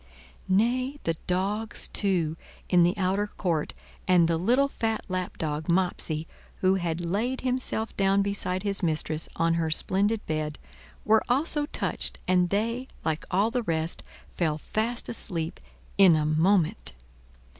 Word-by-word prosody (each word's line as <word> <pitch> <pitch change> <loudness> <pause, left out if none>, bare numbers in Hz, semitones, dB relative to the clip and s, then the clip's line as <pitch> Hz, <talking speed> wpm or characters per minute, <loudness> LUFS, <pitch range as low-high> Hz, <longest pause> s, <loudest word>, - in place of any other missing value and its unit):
Nay, 250 +8 +2
the 165 - +1
dogs, 205 +4 -1
too, 175 -6 0 0.3
in 180 -1 +5
the 175 +2 +3
outer 195 +2 +1
court, 170 -7 -2 0.3
and 180 -2 +5
the 165 -1 +1
little 250 +10 +3
fat 225 -5 -2
lapdog, 160 -4 -3
Mopsey, 170 -3 +1 0.4
who 185 0 +4
had 175 -3 -1
laid 225 +9 -1
himself 250 -3 -2
down 195 0 +3
beside 195 -2 -2
his 200 -1 -1
mistress 155 -2 -1
on 165 0 +2
her 165 -1 0
splendid 200 +7 0
bed, 155 -1 -2 0.5
were 220 +1 +5
also 290 +3 +1
touched, - - -3
and 180 -1 +3
they, 230 +6 -1 0.2
like 160 -1 -1
all 200 +5 +2
the 245 - 0
rest, 165 -5 -2 0.3
fell 155 -4 0
fast 225 +9 -2
asleep 165 -7 -2 0.4
in 185 -4 +8
a 155 -1 +1
moment. 170 +5 +2
185 Hz, 140 wpm, -27 LUFS, 165-220 Hz, 0.5 s, in